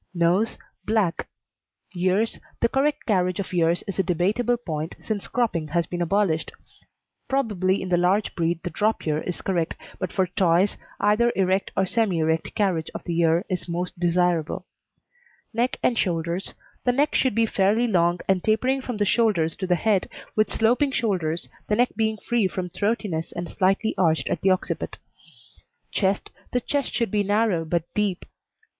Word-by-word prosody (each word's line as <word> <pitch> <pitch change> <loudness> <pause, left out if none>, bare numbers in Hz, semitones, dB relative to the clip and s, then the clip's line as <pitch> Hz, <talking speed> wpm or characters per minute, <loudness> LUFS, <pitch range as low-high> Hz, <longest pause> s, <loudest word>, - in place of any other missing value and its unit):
NOSE 175 +6 +2 0.3
Black. 210 -6 0 0.7
EARS 185 +5 +1 0.2
The 235 - +2
correct 285 +3 0
carriage 185 -4 +1
of 190 - -4
ears 170 0 +2
is 195 -1 -5
a - - +4
debatable 205 +8 +1
point 160 -8 -4
since 210 -3 -4
cropping 220 -10 0
has 170 +2 0
been 175 0 -4
abolished. 175 -2 +1 0.8
Probably 200 -9 +1
in 185 - -5
the 175 - +3
large 185 +4 +2
breed 170 0 -1
the 180 - -3
drop 215 +7 0
ear 155 -1 +1
is 180 - -5
correct, 175 -4 -1 0.2
but 185 - -3
for 190 - +2
Toys 180 +1 +2 0.2
either 215 +4 +3
erect 190 0 +1
or 195 - +3
semi 210 -3 +1
erect 160 0 0
carriage 180 -6 0
of - - -5
the 170 - -3
ear 165 +3 +3
is 180 -1 -3
most 175 +1 -3
desirable. 175 -2 +1 0.9
NECK 240 +3 0
AND 235 - +2
SHOULDERS 170 +1 -1 0.3
The 245 - +2
neck 290 +4 +2
should 260 - +2
be 230 0 +4
fairly 210 +3 +2
long 175 -5 +2
and 190 -2 +2
tapering 255 +5 +2
from 245 -3 -4
the 205 - +1
shoulders 195 -7 +2
to 190 - -3
the 180 - +3
head, 200 +1 +1 0.3
with 215 0 +2
sloping 245 +5 +2
shoulders, 175 -9 -1 0.2
the 210 - +2
neck 245 +3 +3
being 220 -1 0
free 230 -1 +1
from 185 -2 -4
throatiness 200 -6 -1
and 175 0 -4
slightly 195 +5 +1
arched 160 -3 +2
at 165 - -1
the 195 - +3
occiput. 185 -1 -1 0.9
CHEST 195 -1 0 0.2
The 250 - +2
chest 285 +2 -1
should 235 -5 -1
be 210 - +2
narrow 205 -3 +1
but 165 +1 0
deep. 205 -4 -1
190 Hz, 170 wpm, -24 LUFS, 175-220 Hz, 0.9 s, a